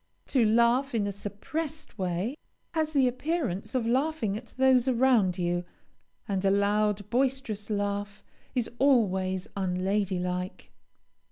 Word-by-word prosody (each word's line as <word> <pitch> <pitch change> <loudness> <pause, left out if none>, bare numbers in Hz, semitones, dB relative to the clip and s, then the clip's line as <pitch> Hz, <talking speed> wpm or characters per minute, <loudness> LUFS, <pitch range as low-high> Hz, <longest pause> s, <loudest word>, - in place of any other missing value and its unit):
To 255 -4 +3
laugh 235 +4 +3
in 210 -3 +1
a 200 - -1
suppressed 295 +12 -6
way, 185 +7 -1 0.4
has 315 -2 0
the 270 -3 +4
appearance 250 - -2
of 245 -3 +1
laughing 255 -3 0
at 235 +3 -7
those 260 -1 +4
around 235 -7 +3
you, 175 0 0 0.6
and 195 -2 -1
a 195 - +4
loud, 205 0 +1
boisterous 250 -5 -1
laugh 205 0 -2 0.3
is 245 -3 +1
always 190 -9 +2
unlady 190 +1 0
like. 180 +1 -4
215 Hz, 125 wpm, -28 LUFS, 195-260 Hz, 0.6 s, the